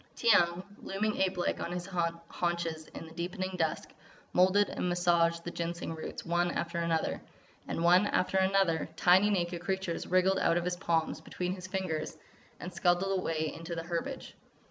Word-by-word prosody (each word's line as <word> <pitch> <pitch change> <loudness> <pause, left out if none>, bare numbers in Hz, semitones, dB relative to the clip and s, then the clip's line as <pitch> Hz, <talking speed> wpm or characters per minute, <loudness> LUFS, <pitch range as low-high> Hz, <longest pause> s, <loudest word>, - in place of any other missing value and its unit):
Tiyang, 175 -6 +4 0.2
looming 210 +2 -1
ape 190 -1 +1
like 175 - 0
on 170 - -3
his 180 0 -4
haunches 170 -2 -2
in - - -9
the 160 - -12
deepening 185 +2 -3
dusk, 160 -3 -1 0.4
moulded 185 +3 +4
and 180 - -2
massaged 170 -1 +2
the 175 - -5
Ginseng 170 -1 -3
roots, 160 - -7
one 175 +1 +1
after 170 0 -2
another. 170 -1 0 0.5
And 165 - -2
one 180 +4 +6
after 185 0 +1
another, 190 -4 +2
tiny 185 +3 +5
naked 175 -3 -1
creatures 190 -1 -2
wriggled 185 +1 +3
out 165 - +3
of 175 - -1
his 180 0 0
palms 165 -3 0
between 180 0 -3
his 185 -1 -8
fingers 180 -5 -3 0.4
and 180 - -7
scuttled 185 +2 +2
away 160 -3 -1
into 165 +1 -6
the 165 - -4
herbage. 175 +11 -4
175 Hz, 165 wpm, -31 LUFS, 170-185 Hz, 0.5 s, one